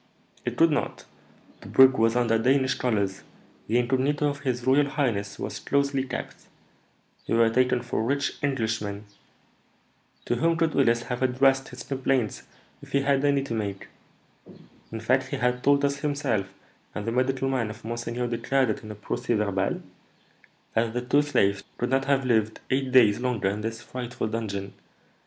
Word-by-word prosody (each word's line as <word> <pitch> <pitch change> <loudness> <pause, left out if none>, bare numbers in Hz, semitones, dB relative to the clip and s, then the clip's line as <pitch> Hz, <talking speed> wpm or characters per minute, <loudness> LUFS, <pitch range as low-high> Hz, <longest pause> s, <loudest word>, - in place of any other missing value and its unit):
"It - - -3
could 165 0 +5
not. 150 - -2 0.6
The - - -11
brig 130 0 +7
was 115 -2 +2
under 115 -2 +2
Danish 130 +2 +2
colours; 100 -6 -1 0.5
the 115 - +2
incognito 135 +4 +1
of 140 -1 -3
his 125 -4 -2
royal 140 +2 +4
highness 115 -8 -1
was - - -5
closely 140 -1 0
kept; 130 -1 -6 0.9
we - - +1
were 115 -1 +4
taken 125 0 +2
for 120 - -2
rich 140 +4 -1
Englishmen. 110 -7 -2 1.2
To 120 - 0
whom 165 +6 +2
could 160 -1 +1
Willis 120 -3 +3
have 125 0 -4
addressed 135 +1 +3
his 125 - -9
complaints, 130 -4 -1 0.4
if - - -14
he 140 - +3
had 140 0 +2
any 140 -1 +2
to 135 - -5
make? 100 -3 -4 1.0
In 110 - -5
fact, 130 +4 +1
he - - -3
had 125 0 0
told 140 0 +4
us 140 0 0
himself, 140 -10 -1 0.4
and 105 - -4
the 115 - -1
medical 130 +2 0
man 130 -5 0
of 110 - -10
monseigneur 120 +1 -3
declared 120 +1 +1
it - - -5
in 110 - -9
a 105 - -6
procès 105 +2 -2
verbal, 100 -2 -1 0.9
that 115 0 0
the 125 - 0
two 140 +4 +3
slaves 100 -9 +1
could 120 - -2
not 135 0 +2
have 135 -1 +1
lived 110 -3 +1
eight 130 0 0
days 115 -4 +5
longer 125 -6 0
in 105 +2 -3
this 115 +1 -5
frightful 125 0 -5
dungeon. 100 -3 -4
125 Hz, 170 wpm, -26 LUFS, 110-135 Hz, 1.2 s, brig